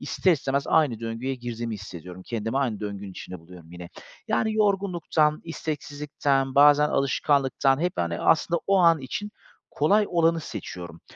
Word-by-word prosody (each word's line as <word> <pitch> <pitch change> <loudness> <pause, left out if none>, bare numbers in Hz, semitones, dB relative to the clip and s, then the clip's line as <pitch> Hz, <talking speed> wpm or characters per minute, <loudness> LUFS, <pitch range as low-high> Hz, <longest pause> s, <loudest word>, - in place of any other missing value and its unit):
ister 185 - +1
istemez 140 -2 -1
aynı 130 -8 +2
döngüye 115 +4 -3
girdiğimi 120 -2 -5
hissediyorum. 90 -2 -9
Kendimi 115 +3 -2
aynı 115 -7 -1
döngünün 100 -1 -6
içinde 90 0 -9
buluyorum 85 -1 -15
yine. 90 -1 -9 0.4
Yani, 220 -1 +1
yorgunluktan, 185 -7 +1
isteksizlikten, 145 -4 -2
bazen 145 +1 +6
alışkanlıktan 135 0 +1
hep, 180 0 0
hani, 85 -1 -2
aslında 170 +2 +2
o 195 0 +3
an 165 -3 +5
için 205 +11 -5 0.4
kolay 205 +8 +3
olanı 165 -1 +2
seçiyorum. 85 - -8
135 Hz, 140 wpm, -25 LUFS, 110-160 Hz, 0.4 s, bazen